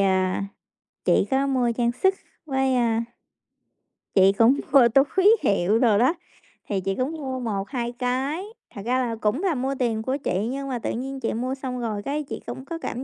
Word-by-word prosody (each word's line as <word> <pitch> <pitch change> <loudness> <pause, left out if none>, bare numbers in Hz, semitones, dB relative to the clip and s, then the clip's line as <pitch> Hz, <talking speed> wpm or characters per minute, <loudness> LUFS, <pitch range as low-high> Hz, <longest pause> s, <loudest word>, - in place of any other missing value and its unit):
à, 190 0 +1 0.6
chị - - +3
có 270 +1 +2
mua 250 -3 +1
trang 235 0 +1
sức 380 +9 +2 0.3
với, 265 -2 +1
a, 230 -1 +1 1.1
chị 190 0 +6
cũng 240 +5 +5
mua 260 -4 +7 0.3
túi 410 +4 +6
hiệu 200 +2 +2
đồ 225 -5 +4
đó, 255 +9 +4 0.5
thì 195 -2 -1
chị 195 +1 -2
cũng 255 +4 -1
mua 265 -4 -4
1-2 235 +2 -3
cái, 265 +8 -1 0.3
thật 200 - -7
ra 255 +2 +1
là 235 -3 -1
cũng 220 - -1
là 350 -6 +1
mua 265 +2 -1
tiền 225 -3 0
của 260 +4 -1
chị, 205 -6 -1
nhưng 275 0 -4
mà 245 -2 -2
tự - - -3
nhiên 270 +3 -4
chị 230 - -2
mua 255 +4 -2
xong 255 -2 -5
rồi 215 -3 -3
cái 295 +4 -2
chị - - -7
cũng 260 - -7
có 335 +2 -5
cảm 255 -5 -5
250 Hz, 200 wpm, -24 LUFS, 225-270 Hz, 1.1 s, mua